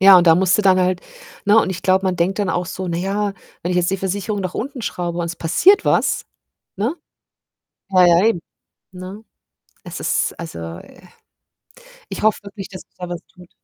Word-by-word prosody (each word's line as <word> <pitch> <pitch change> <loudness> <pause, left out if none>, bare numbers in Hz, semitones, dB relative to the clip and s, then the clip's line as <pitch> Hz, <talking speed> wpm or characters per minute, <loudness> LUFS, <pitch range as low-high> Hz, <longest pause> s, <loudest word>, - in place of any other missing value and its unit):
Ja, 195 0 +9
und 175 - +2
da 165 - +8
musste 185 +3 +3
dann 185 -1 +5
halt 180 0 +1 0.4
ne? 210 +2 +5
Und - - -1
ich 185 - -5
glaube, 190 +1 +3
man 185 -1 0
denkt 185 +4 0
dann 200 -2 0
auch 175 -1 0
so: 185 +1 -5
„Na 170 - -1
ja, 200 +2 -1 0.3
wenn 175 - -2
ich 180 - 0
jetzt 175 +1 +2
die 195 - 0
Versicherung 200 +2 -2
nach 185 -1 -4
unten 265 +1 -4
schraube 175 -4 -3
und 170 - -1
es 170 - -5
passiert 380 - +4
was“, - - +2 0.5
ne? 235 - -1 0.9
Ja, 185 -2 +6
ja, 175 +3 +5
eben. 175 -7 +1 0.5
Ne? 185 +4 -9 0.6
Es - - -7
ist, - - 0
also, 165 - -7 0.2
äh 180 - -15 1.1
ich - - -5
hoffe 215 0 +3
wirklich, 200 -1 -8
dass 185 -2 -9
sich - - -23
da 180 -1 -6
was 175 -1 -5
tut. 180 -1 -16
185 Hz, 200 wpm, -20 LUFS, 175-200 Hz, 1.1 s, Ja